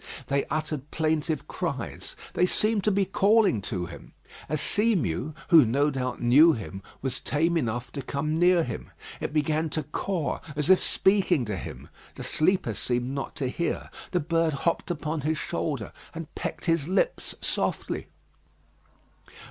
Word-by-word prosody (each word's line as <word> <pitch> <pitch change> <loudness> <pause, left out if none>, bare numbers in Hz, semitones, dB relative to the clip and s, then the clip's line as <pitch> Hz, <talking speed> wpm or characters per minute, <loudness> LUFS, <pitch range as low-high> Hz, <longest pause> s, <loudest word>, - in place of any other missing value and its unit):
They 140 0 +1
uttered 150 -2 -3
plaintive 155 -1 0
cries: - - -4 0.2
they 180 - +3
seemed 215 +1 +2
to 210 - +4
be 195 0 +2
calling 200 - +3
to 95 -3 -3
him. 85 - -11 0.4
A 155 - 0
sea 215 +8 +3
mew, 135 - -1
who 165 -5 +9
no 140 +6 +2
doubt 130 -2 -3
knew 145 +8 +7
him, 100 -5 -6 0.2
was 130 -2 -2
tame 165 +3 +1
enough 120 -5 -1
to 140 - -4
come 150 +4 -2
near 175 -1 +5
him. 120 -5 -5 0.3
It - - -3
began 155 +1 +1
to 155 +1 -2
caw 160 +3 -2 0.2
as 150 +4 +2
if 190 - +6
speaking 190 -8 +3
to 105 -2 -2
him. 75 -7 -7 0.3
The - - -7
sleeper 170 - +1
seemed 120 +4 -1
not 140 0 -4
to 135 - -1
hear. 170 +7 -2 0.2
The 180 - +1
bird 165 0 +1
hopped 170 +6 -1
upon 155 -2 -2
his 155 +2 0
shoulder, 145 -8 -3 0.2
and 165 -1 -7
pecked - - -5
his 165 -3 +1
lips 200 - 0
softly. - - -2
155 Hz, 160 wpm, -27 LUFS, 130-170 Hz, 0.4 s, who